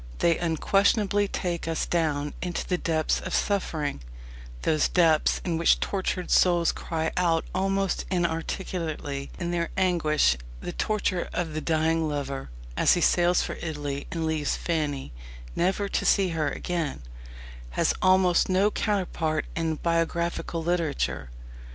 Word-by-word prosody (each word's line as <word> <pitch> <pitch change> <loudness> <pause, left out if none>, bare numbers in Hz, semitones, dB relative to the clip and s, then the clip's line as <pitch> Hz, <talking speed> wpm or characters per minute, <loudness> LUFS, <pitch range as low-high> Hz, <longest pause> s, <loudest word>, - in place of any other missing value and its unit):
They 165 - +2
unquestionably 200 +4 +2
take 175 -3 -3
us 165 -1 -1
down 150 -4 0
into 175 -1 -3
the 180 -1 0
depths 160 -2 +1
of 185 - -3
suffering 155 - -1 0.6
those 155 -1 +2
depths 165 -4 +3
in 165 -3 0
which 170 - +4
tortured 185 -2 -2
souls 175 -2 +4
cry 160 -1 -3
out 170 -2 +2
almost 195 0 0
inarticulately 165 -4 -2
in 175 -1 -3
their 170 -1 -1
anguish. 155 - +3 0.2
The - - -5
torture 200 -4 -1
of 165 -3 -2
the 155 - -2
dying 160 0 +1
lover, 140 - -4 0.3
as - - +4
he 175 - 0
sails 175 +1 +3
for - - -5
Italy 145 -3 -4
and 165 -2 -2
leaves 160 -2 0
Fanny, 150 - -2 0.4
never 190 +3 +1
to - - -1
see 195 -2 +3
her 160 -3 0
again, 165 - -3 0.7
has - - +3
almost 185 -1 +4
no 195 +3 +3
counterpart 175 -8 -1
in 165 -1 0
biographical 170 0 -1
literature. 160 - -1
170 Hz, 135 wpm, -26 LUFS, 155-180 Hz, 0.7 s, which